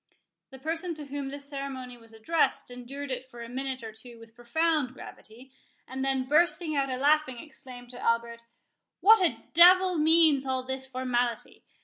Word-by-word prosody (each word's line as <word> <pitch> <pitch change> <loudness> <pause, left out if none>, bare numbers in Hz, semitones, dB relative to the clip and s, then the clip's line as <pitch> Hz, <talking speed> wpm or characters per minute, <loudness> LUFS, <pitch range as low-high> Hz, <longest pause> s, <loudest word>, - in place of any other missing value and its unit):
The 265 - -12
person 330 +5 -3
to 300 -1 -8
whom 280 0 -5
this 280 0 -8
ceremony 270 -3 -6
was 230 -1 -12
addressed 245 +4 0
endured 265 +3 -7
it 255 +1 -5
for 240 -2 -9
a - - -8
minute 260 +1 -4
or 220 - -6
two 230 +2 -12
with 230 0 -15
profound 265 +3 0
gravity, 245 +4 -11 0.4
and 265 +1 -4
then 270 -1 0
bursting 320 +1 +2
out 275 -1 0
a 255 - -2
laughing, 290 -1 +2
exclaimed 250 -3 -10
to 245 - -10
Albert, 235 0 0 0.6
"What 440 0 +7
a 345 - 0
devil 360 +1 +6
means 315 -3 +4
all 260 -1 -2
this 265 +1 -3
formality? 245 -2 -2
265 Hz, 170 wpm, -28 LUFS, 245-305 Hz, 0.6 s, What